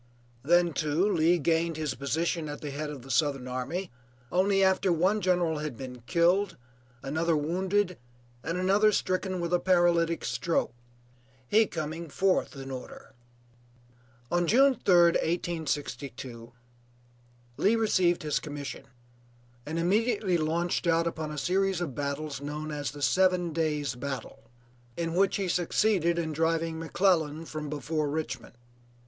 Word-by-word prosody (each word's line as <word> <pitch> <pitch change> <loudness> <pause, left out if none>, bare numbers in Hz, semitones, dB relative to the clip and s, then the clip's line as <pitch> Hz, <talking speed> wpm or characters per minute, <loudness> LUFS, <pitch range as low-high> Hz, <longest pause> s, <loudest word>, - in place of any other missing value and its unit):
Then, 175 +4 +3
too, 155 +6 +1
Lee 165 +2 +3
gained 165 +1 0
his 155 -3 -2
position 155 +4 -2
at 145 - -7
the 145 - -5
head 150 +2 -4
of 140 -4 -8
the 135 - -7
Southern 140 -4 +1
army 135 +9 -4 0.4
only 195 +2 +3
after 190 0 +3
one 185 +6 +2
general 175 -4 +1
had 150 -6 -5
been 125 -2 -8
killed, 180 +6 +2 0.5
another 160 +3 0
wounded, 185 +4 0 0.4
and 165 +2 -2
another 200 +4 +4
stricken 185 -1 -1
with 170 0 -2
a 175 - +4
paralytic 175 -2 +2
stroke; 170 - -1 0.7
he 220 - +4
coming 160 +1 -5
fourth 185 +1 +1
in 135 0 -7
order. 130 0 -9 1.2
On 175 0 +2
June 270 +8 +5
3d, 175 -7 +4
1862, 140 -8 -3 1.1
Lee 210 +4 +3
received 185 -7 +2
his 150 -2 0
commission, 145 -2 -7 0.8
and 160 +2 -3
immediately 195 +2 +1
launched 170 +2 0
out 165 0 +3
upon 160 -2 -3
a 150 - -6
series 190 +3 +1
of 170 -7 -3
battles 140 +1 -4
known 150 +2 -5
as 145 -1 -3
the 145 0 -7
seven 180 -2 +2
days 150 -3 -1
battle, 130 0 -7 0.5
in 165 -1 -2
which 195 +2 +2
he 195 -2 -1
succeeded 175 0 +1
in 165 -2 -1
driving 165 +1 0
McClellan 165 -2 +1
from 155 -2 -6
before 150 0 -2
Richmond. 155 -4 -4
165 Hz, 140 wpm, -28 LUFS, 150-180 Hz, 1.2 s, June